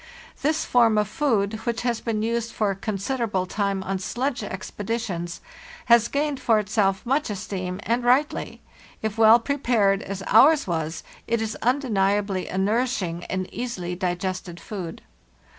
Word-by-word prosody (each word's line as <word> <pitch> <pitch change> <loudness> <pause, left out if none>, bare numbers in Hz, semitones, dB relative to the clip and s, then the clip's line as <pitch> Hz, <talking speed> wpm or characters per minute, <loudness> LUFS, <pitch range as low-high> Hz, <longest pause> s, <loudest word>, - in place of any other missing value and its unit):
This 305 +3 +1
form 230 -3 +4
of 210 -1 +2
food, 220 -6 0
which 235 -1 -1
has 240 -2 0
been 220 -2 -1
used 230 0 -1
for 210 -2 +1
a - - -3
considerable 205 0 -2
time 195 0 -1
on 190 0 -2
sledge 250 +7 -2
expeditions, 195 -2 -4 0.4
has 235 -1 +5
gained 285 0 -1
for 225 -2 +3
itself 205 -1 +1
much 275 +3 +1
esteem, 190 -2 -4
and 235 +2 0
rightly; 260 +5 +1 0.4
if 220 0 -2
well 225 +1 +8
prepared, 230 -6 +1
as 195 0 -6
ours 280 +8 +6
was, 160 -2 -3 0.2
it 235 0 +1
is 220 0 -2
undeniably 205 -7 +1
a 185 - -4
nourishing 195 -4 0
and 185 0 -3
easily 195 -8 -4
digested 180 -1 -3
food. 180 -3 -7
215 Hz, 145 wpm, -24 LUFS, 190-235 Hz, 0.4 s, well